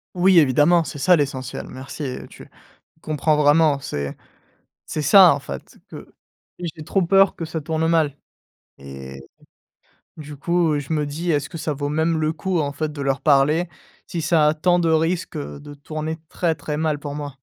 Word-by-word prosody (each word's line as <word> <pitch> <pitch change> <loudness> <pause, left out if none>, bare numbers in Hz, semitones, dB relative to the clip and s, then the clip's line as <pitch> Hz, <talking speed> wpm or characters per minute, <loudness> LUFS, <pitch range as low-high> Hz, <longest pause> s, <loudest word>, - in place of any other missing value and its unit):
Oui, 180 0 +5
évidemment, 150 +4 +4
c'est 150 - -7
ça 180 +6 +4
l'essentiel. 135 -4 -3
Merci, 130 +4 -9
heu, 130 -2 -5
tu - - -14 0.5
comprends 155 0 0
vraiment. 150 0 +4
C'est 70 - -5 0.7
c'est 155 - -4
ça 185 0 +7
en 145 - -3
fait, 70 - -9
que - - -11 0.5
j'ai 165 -3 -6
trop 195 - 0
peur, 195 +2 +4
que 165 - -4
ça 160 0 -5
tourne 160 +1 -1
mal. 155 -4 +1 0.6
Et, 70 -1 -10 1.0
du 150 -1 -9
coup, 170 0 +1
je 145 +1 -6
me 150 -2 0
dis: 165 +4 -3
«Est-ce 145 -2 0
que 165 - -8
ça 155 - -3
vaut 145 0 -3
même 160 +2 0
le 155 +1 0
coup 180 +1 -2
en 140 -1 -2
fait 155 +1 -3
de 145 -1 -7
leur 135 0 -1
parler, 150 +4 +3 0.4
si 170 - -4
ça 155 -1 +3
a 150 - +3
tant 175 +3 +2
de 170 -1 +1
risque, 165 +1 0
heu, 145 0 -7
de 145 0 -10
tourner 155 +2 -5
très, 170 0 -1
très 150 0 -5
mal 155 -1 -1
pour 145 -1 -6
moi? 145 -2 -6
155 Hz, 190 wpm, -22 LUFS, 145-165 Hz, 1.0 s, ça